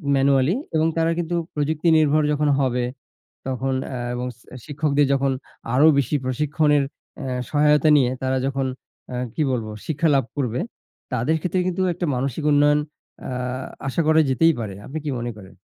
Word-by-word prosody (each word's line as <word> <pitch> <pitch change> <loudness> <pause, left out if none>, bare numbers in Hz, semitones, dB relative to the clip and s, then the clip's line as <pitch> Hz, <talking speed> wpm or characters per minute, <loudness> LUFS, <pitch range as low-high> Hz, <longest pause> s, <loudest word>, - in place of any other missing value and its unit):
Manually 135 - +3 0.2
এবং 160 +1 +3
তারা 165 0 +2
কিন্তু 175 +1 -2 0.2
প্রযুক্তি 150 +3 0
নির্ভর 155 0 +3
যখন 150 0 +1
হবে, 125 -2 +1 0.6
তখন 130 0 -1
আ 130 - -6 0.2
এবং 125 +1 -3
সি 115 - -24
আ - - -7
শিক্ষকদের 145 -1 +1
যখন 135 0 +2 0.4
আরও 145 +4 +6
বেশি 140 +2 +1
প্রশিক্ষণের 150 +2 +2 0.4
এ - - -4 0.3
সহায়তা 150 +1 +4
নিয়ে 125 -3 +3
তারা 130 0 0
যখন 135 0 -1 0.5
আ - - -3 0.2
কি 155 - 0
বলব? 115 -3 -2 0.2
শিক্ষা 160 +1 +1
লাভ 135 -3 +3
করবে, 125 -1 -1 0.5
তাদের 125 +6 +1
ক্ষেত্রে 180 +2 0
কিন্তু 185 +1 -1
একটা 175 0 -3
মানসিক 135 +3 -2
উন্নয়ন 145 +1 +4 0.5
আ - - -4 0.6
আশা 135 - -1
করা 160 0 +5
যেতেই 165 +5 +4
পারে। 100 -4 -4
আপনি 155 - -5
কি - - 0
মনে 120 +1 -3
করেন? 95 -1 -14
145 Hz, 170 wpm, -22 LUFS, 130-155 Hz, 0.6 s, আরও